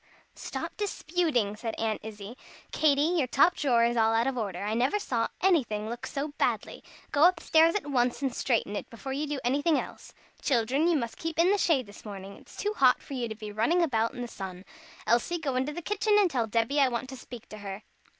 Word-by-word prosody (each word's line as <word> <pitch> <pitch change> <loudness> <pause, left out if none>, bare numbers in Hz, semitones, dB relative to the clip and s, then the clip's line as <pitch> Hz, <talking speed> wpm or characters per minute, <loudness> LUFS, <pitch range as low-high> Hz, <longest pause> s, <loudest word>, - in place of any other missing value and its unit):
"Stop - - -6
disputing," 320 - 0
said 225 +1 -4
Aunt 220 -1 -1
Izzie. 210 +1 -8 0.4
"Katy 290 -2 +3 0.2
your 265 - +1
top 290 +8 +4
drawer 245 -5 +2
is 235 +1 +1
all 225 -1 +3
out 230 +1 +2
of 270 -1 -1
order. 200 -6 -3
I 210 +1 -1
never 255 - +2
saw 240 - -1
anything 240 - +2
look 240 0 -6
so 285 +2 -3
badly. - - -1 0.3
Go 295 +2 +5
up 360 -1 +4
stairs 325 +2 +4
at 415 - -1
once 250 -2 0
and 265 -3 0
straighten 225 -5 0
it, - - -5
before 265 +4 -6
you 295 +3 -2
do 290 -1 -3
anything 285 +5 +2
else. - - -8 0.3
Children, 265 +5 +2
you 345 - +3
must 235 -4 -4
keep 325 -1 -4
in 345 +3 +4
the 410 - +3
shade 285 -10 +2
this 205 0 -14
morning. 200 -2 -8
It's - - -16
too 415 +1 -1
hot 255 -2 +5
for - - -10
you 245 -3 -2
to 220 - -6
be 215 -1 -7
running 235 +12 +2
about 230 -4 0
in 245 - -4
the - - -4
sun. 190 -4 -8 0.4
Elsie, 240 +9 +2
go 285 -6 -2
into 260 +3 0
the 345 +3 -7
kitchen 415 +2 +2
and 395 -5 +4
tell 235 -5 0
Debby 230 +6 +1
I 275 - +5
want 245 +1 -3
to 265 - -7
speak 245 -2 -11
to 215 - -9
her." 200 0 -7
250 Hz, 230 wpm, -28 LUFS, 225-305 Hz, 0.4 s, Go